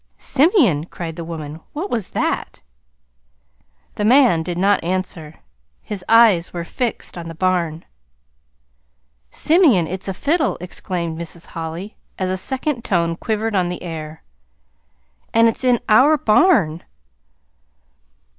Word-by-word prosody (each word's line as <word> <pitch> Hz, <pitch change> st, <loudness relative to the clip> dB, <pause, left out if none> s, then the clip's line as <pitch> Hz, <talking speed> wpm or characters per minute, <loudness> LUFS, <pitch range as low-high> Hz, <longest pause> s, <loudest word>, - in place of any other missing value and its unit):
"Simeon!" 265 Hz, -, +3 dB
cried 165 Hz, -3 st, -7 dB
the 170 Hz, -, -6 dB
woman. 160 Hz, -2 st, -7 dB
"What 345 Hz, +7 st, -4 dB
was 225 Hz, -6 st, -2 dB
that?" -, -, -3 dB, 1.3 s
The 210 Hz, -, -3 dB
man 240 Hz, -6 st, +5 dB
did 175 Hz, +1 st, -4 dB
not 195 Hz, +1 st, +2 dB
answer. 170 Hz, -3 st, -4 dB, 0.4 s
His 200 Hz, -3 st, -6 dB
eyes 220 Hz, -7 st, +5 dB
were 170 Hz, -1 st, -4 dB
fixed 230 Hz, -1 st, -4 dB
on 165 Hz, -, -7 dB
the 165 Hz, -, -8 dB
barn. 170 Hz, -2 st, -1 dB, 1.4 s
"Simeon, 300 Hz, -, +3 dB
it's 185 Hz, +4 st, -6 dB
a 195 Hz, -, -2 dB
fiddle!" 310 Hz, -, 0 dB
exclaimed 170 Hz, -2 st, -4 dB
Mrs. 170 Hz, 0 st, -8 dB
Holly, 165 Hz, +4 st, -6 dB, 0.2 s
as 185 Hz, -1 st, -1 dB
a -, -, 0 dB
second 260 Hz, +4 st, -3 dB
tone 170 Hz, -3 st, 0 dB
quivered 220 Hz, +4 st, -2 dB
on 180 Hz, -3 st, +1 dB
the 180 Hz, -, -6 dB
air 160 Hz, -2 st, -7 dB, 1.1 s
"And 230 Hz, 0 st, +6 dB
it's 230 Hz, -, -2 dB
in 250 Hz, -2 st, +3 dB
our 265 Hz, +8 st, +5 dB
barn!" 210 Hz, -, +3 dB
185 Hz, 125 wpm, -20 LUFS, 165-230 Hz, 1.4 s, And